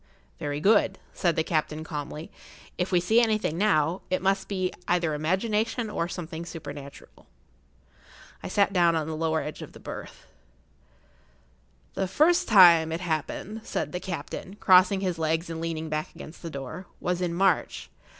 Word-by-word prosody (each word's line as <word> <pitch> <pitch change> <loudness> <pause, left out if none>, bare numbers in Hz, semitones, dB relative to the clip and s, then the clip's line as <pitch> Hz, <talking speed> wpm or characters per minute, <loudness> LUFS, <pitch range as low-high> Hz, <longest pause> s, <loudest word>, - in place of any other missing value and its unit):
"Very 145 0 -3
good," 195 +1 +3 0.2
said 170 -3 +1
the 160 - +1
captain, 155 -1 -1
calmly. 150 0 -6 0.4
"If 180 +2 -2
we 180 - +4
see 220 +7 +4
anything 215 -8 +1
now, 175 -3 +2
it 185 - +1
must 195 +1 0
be 185 -2 -2
either 170 -3 +1
imagination 210 +8 0
or 170 - -1
something 170 -2 -6
supernatural." 145 -4 -10 1.1
I - - -6
sat 200 -1 +2
down 170 -3 +4
on 160 -1 0
the 160 - -4
edge 160 -1 -2
of - - -9
the - - -12
lower - - -21
berth. - - -9 1.7
"The 190 - -1
first 310 - +3
time 170 -6 +7
it 165 +2 -3
happened," 175 +6 -3
said - - -3
the 180 - -3
captain, 185 +1 -6
crossing 190 0 +5
his 180 -4 -2
legs 160 +2 0
and 165 0 -5
leaning 160 -1 -3
back 155 0 -4
against 155 - -11
the 170 - -6
door,[Pg 155 +6 -7
61] - - -31
"was 180 0 -1
in 170 -2 -1
March. 190 0 +1
175 Hz, 165 wpm, -27 LUFS, 160-190 Hz, 1.7 s, time